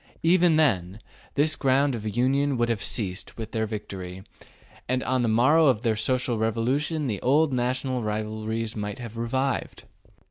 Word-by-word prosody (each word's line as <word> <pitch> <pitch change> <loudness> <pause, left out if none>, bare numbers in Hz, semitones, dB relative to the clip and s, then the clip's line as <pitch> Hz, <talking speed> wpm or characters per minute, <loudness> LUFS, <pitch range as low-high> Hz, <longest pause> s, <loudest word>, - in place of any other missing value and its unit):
Even 170 0 +4
then, 100 - +1 0.4
this 155 +2 +3
ground 135 +1 +2
of 110 -1 -4
union 135 +2 +2
would 120 0 +1
have 115 -3 -1
ceased 100 -3 -2
with 110 -1 -6
their 110 -1 -1
victory, 95 -4 -7 0.7
and 130 0 0
on 130 -1 +1
the 120 - +1
morrow 130 +8 +4
of 120 -5 +2
the 115 -2 +2
social 120 +1 0
revolution 130 +8 0
the 105 -7 -3
old 145 +3 +3
national 125 +1 -1
rivalries 110 +1 -3
might 105 -1 -4
have 115 -2 -8
revived. 130 +4 -2
120 Hz, 155 wpm, -25 LUFS, 110-135 Hz, 0.7 s, Even